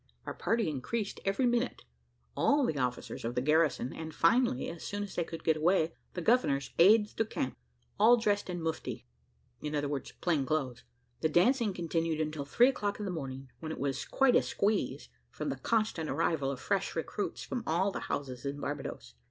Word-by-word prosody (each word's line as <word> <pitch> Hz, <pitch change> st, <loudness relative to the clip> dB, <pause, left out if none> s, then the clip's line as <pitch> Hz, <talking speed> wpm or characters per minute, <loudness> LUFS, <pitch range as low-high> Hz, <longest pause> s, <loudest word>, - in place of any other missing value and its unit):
Our -, -, -4 dB
party 225 Hz, -3 st, 0 dB
increased 195 Hz, -, -3 dB
every 195 Hz, +6 st, +2 dB
minute: 240 Hz, +1 st, 0 dB, 0.5 s
all 285 Hz, -1 st, +3 dB
the 150 Hz, -, -1 dB
officers 125 Hz, -1 st, -3 dB
of 120 Hz, +1 st, -3 dB
the -, -, +2 dB
garrison, 150 Hz, -2 st, +2 dB
and, 160 Hz, -1 st, -7 dB
finally, 200 Hz, -, +3 dB
as 165 Hz, -, -7 dB
soon 205 Hz, 0 st, -3 dB
as 200 Hz, -, -7 dB
they 175 Hz, -, 0 dB
could 165 Hz, 0 st, -8 dB
get 160 Hz, -1 st, +3 dB
away, 165 Hz, 0 st, +2 dB, 0.2 s
the 175 Hz, -, -3 dB
governor's 140 Hz, -, +2 dB
aides 210 Hz, +4 st, +6 dB
de -, -, +1 dB
camp, 135 Hz, -11 st, -3 dB, 0.4 s
all 235 Hz, +3 st, +7 dB
dressed 205 Hz, -4 st, 0 dB
in 175 Hz, -2 st, -3 dB
mufti 125 Hz, -7 st, -3 dB, 0.6 s
(i.e. 150 Hz, -, -3 dB, 0.5 s
plain 165 Hz, -6 st, +2 dB
clothes). 135 Hz, -4 st, -2 dB, 0.4 s
The 160 Hz, -, +1 dB
dancing 215 Hz, -, +3 dB
continued 165 Hz, -2 st, -1 dB
until 155 Hz, -2 st, -2 dB
three 240 Hz, -, +5 dB
o'clock 205 Hz, -6 st, -2 dB
in 210 Hz, -, -4 dB
the 190 Hz, -, -2 dB
morning, 135 Hz, -5 st, -6 dB
when 160 Hz, -1 st, -5 dB
it -, -, -5 dB
was 135 Hz, -1 st, -1 dB
quite 270 Hz, -2 st, +3 dB
a -, -, +6 dB
squeeze, 200 Hz, -, -1 dB, 0.2 s
from -, -, -4 dB
the 135 Hz, -, -3 dB
constant 215 Hz, -, 0 dB
arrival 145 Hz, -5 st, +1 dB
of 135 Hz, -2 st, -4 dB
fresh 195 Hz, +4 st, -1 dB
recruits 170 Hz, +5 st, -3 dB
from 250 Hz, -, -3 dB
all 180 Hz, +5 st, +2 dB
the -, -, -4 dB
houses 130 Hz, -3 st, -3 dB
in 140 Hz, +1 st, -3 dB
Barbadoes. -, -, -5 dB
165 Hz, 185 wpm, -31 LUFS, 140-205 Hz, 0.6 s, all